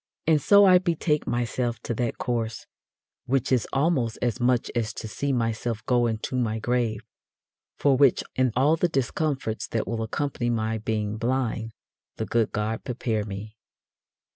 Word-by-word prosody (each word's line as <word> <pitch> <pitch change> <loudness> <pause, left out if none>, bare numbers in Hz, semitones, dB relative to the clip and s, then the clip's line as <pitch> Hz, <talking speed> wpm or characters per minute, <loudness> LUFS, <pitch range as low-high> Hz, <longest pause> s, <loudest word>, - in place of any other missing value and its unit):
And 155 -2 +3
so 200 +6 +7
I 185 -1 +7
betake 165 -4 0
myself 120 -1 -1
to 120 - -3
that 115 0 -2
course, 115 -2 -2 0.6
which 135 0 0
is 125 -5 +2
almost 135 -6 +1
as 120 0 -1
much 125 -1 +1
as 115 -1 -2
to - - -5
see 140 +6 -2
myself 115 -2 -1
go 120 -1 +3
into 110 +3 -3
my 115 -3 0
grave; 115 -1 0 0.8
for 140 -2 +3
which, 135 -2 +4
and 130 -1 +2
all 140 +5 +4
the 175 +2 +1
discomforts 135 -4 -1
that 115 - -2
will 115 -1 -2
accompany 120 +2 -2
my 110 -1 -1
being 105 -1 -2
blind, 115 -2 -1 0.4
the - - -3
good 115 -2 +1
God 110 +1 -2
prepare 115 -4 -2
me. 105 +2 -7
120 Hz, 160 wpm, -26 LUFS, 110-135 Hz, 0.8 s, so